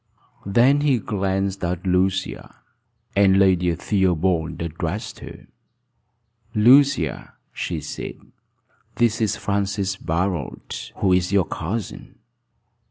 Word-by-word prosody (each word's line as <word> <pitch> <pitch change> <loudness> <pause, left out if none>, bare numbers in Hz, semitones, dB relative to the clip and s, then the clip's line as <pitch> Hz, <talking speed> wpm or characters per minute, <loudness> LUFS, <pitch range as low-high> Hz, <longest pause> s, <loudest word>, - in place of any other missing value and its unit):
Then 125 +8 +4
he 145 -4 +3
glanced 95 -2 -2
at 90 +1 -2
Lucia, 95 +1 -1 0.6
and 100 -1 +5
Lady 90 -3 +3
Theobald 90 -3 0
addressed 85 +4 -4
her: - - -11 1.1
"Lucia," 125 - +4 0.2
she - - -3
said, - - -6 0.8
"this 115 -1 +1
is 110 -1 +1
Francis 100 -2 -2
Barold, 85 -4 -3
who 95 -2 +2
is 90 0 +1
your 100 -3 +3
cousin." 100 +7 -5
95 Hz, 100 wpm, -22 LUFS, 90-105 Hz, 1.1 s, and